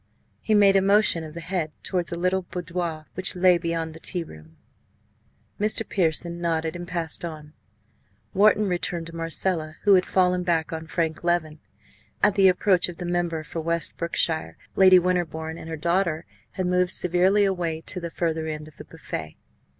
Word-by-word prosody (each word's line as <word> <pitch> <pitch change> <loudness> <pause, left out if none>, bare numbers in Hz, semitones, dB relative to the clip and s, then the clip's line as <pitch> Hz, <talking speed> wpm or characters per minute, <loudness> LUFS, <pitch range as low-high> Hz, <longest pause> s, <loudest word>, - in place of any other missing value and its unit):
He 215 - +1
made 200 -1 +5
a 195 - +5
motion 200 -4 +3
of 155 0 -10
the 170 - -6
head 170 -3 -2
towards 180 -2 -2
a 170 - -3
little 185 +2 +1
boudoir 175 -3 -5
which 185 0 +3
lay 180 -1 +4
beyond 165 -1 -3
the 160 - -11
tea 175 +1 -2
room. 80 - -15 1.0
Mr. 215 +1 0
Pearson 170 -1 -1
nodded 165 -1 -1
and 175 0 -7
passed 170 -3 -3
on. 155 -3 -7 0.8
Wharton 210 +1 +4
returned 175 -2 -2
to 165 0 -10
Marcella, 165 -1 -2
who 205 - +6
had 185 -1 +5
fallen 180 -1 +2
back 165 -3 0
on 160 0 -6
Frank 160 -1 -2
Leven. 165 -3 0 0.6
At 205 0 +5
the 195 -1 +5
approach 185 0 +3
of 175 - -9
the 180 - -6
member 175 -2 -1
for 165 +1 -5
West 170 -1 -2
Brookshire, 160 - -1 0.2
Lady 185 -1 +7
Winterbourne 170 -3 -1
and 160 - -9
her 160 - -4
daughter 170 0 0 0.3
had 185 - -2
moved 180 0 +2
severely 185 +3 +4
away 175 -5 -1
to 180 - -5
the 170 -1 -5
further 160 -1 -2
end 155 -1 -5
of 155 - -17
the - - -10
buffet. 80 0 -7
170 Hz, 180 wpm, -24 LUFS, 160-185 Hz, 1.0 s, Lady